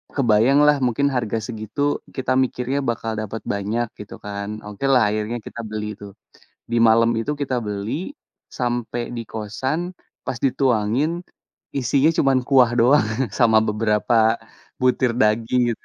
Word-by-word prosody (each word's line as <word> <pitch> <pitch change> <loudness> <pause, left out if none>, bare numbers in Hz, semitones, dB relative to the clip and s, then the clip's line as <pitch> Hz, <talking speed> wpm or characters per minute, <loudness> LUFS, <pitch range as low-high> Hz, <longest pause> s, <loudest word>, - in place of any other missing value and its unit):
kebayanglah 140 +4 +4
mungkin 130 +3 +2
harga 115 -3 -1
segitu 120 +6 -2 0.2
kita 130 -1 0
mikirnya 130 +1 0
bakal 115 -2 -2
dapet 110 +1 -5
banyak 110 +4 -2
gitu 105 - -9
kan. 100 +1 -5
Okelah 110 +2 +2
akhirnya 110 +3 -2
kita 120 - -9
beli 105 -1 -5
itu, 100 -1 -10 0.6
di 120 - -1
malam 115 +1 +5
itu 115 +6 -1
kita 130 -4 -1
beli 105 - -4 0.4
sampai 120 -1 -2
di 115 - -4
kosan 130 - -3 0.3
pas - - -2
dituangin 135 +5 +1 0.5
isinya 135 +3 +2
cuman 135 -1 +4
kuah 130 -4 +5
doang 130 +4 +5 0.3
sama 115 -3 +4
beberapa 110 +1 +2 0.5
butir 125 -1 +2
daging 115 +2 +2
itu. - - -31
120 Hz, 135 wpm, -22 LUFS, 110-130 Hz, 0.6 s, malam